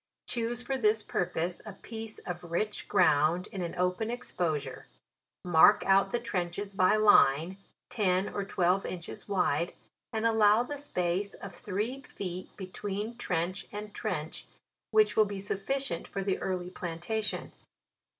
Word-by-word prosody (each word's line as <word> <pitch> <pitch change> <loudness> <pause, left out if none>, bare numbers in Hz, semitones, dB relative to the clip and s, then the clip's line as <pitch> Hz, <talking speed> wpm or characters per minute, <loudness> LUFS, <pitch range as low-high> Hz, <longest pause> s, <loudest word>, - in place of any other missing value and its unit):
" - - -61
Choose 240 +1 -2
for 265 +1 -2
this 215 -1 +3
purpose 175 0 -2
a 215 - -8
piece 220 +2 -8
of 175 -1 -6
rich 175 +5 -2
ground, 160 +5 +3
in 190 - -4
an 170 -1 -4
open 180 +5 0
exposure; 160 - -3 0.6
mark 175 +4 +6
out 195 0 +4
the 240 - 0
trenches 195 -2 -3
by 185 +2 +4
line, 185 -5 +5 0.3
ten 190 -3 +1
or 200 - -3
twelve 190 -1 +1
inches 180 +2 -6
wide, 175 -4 +1 0.4
and 220 0 -1
allow 220 0 +5
the 290 +3 -6
space 185 -6 -1
of 200 -2 -9
three 210 +9 -3
feet 185 -7 -6
between 205 +3 -4
trench 180 +1 -2
and 210 0 -7
trench, 175 -8 -4 0.4
which 215 -1 +4
will 215 - +6
be 200 -1 -5
sufficient 200 +1 -2
for 195 - -4
the 190 -1 0
early 180 -1 -3
plantation. 180 +5 -3
195 Hz, 145 wpm, -30 LUFS, 180-215 Hz, 0.6 s, mark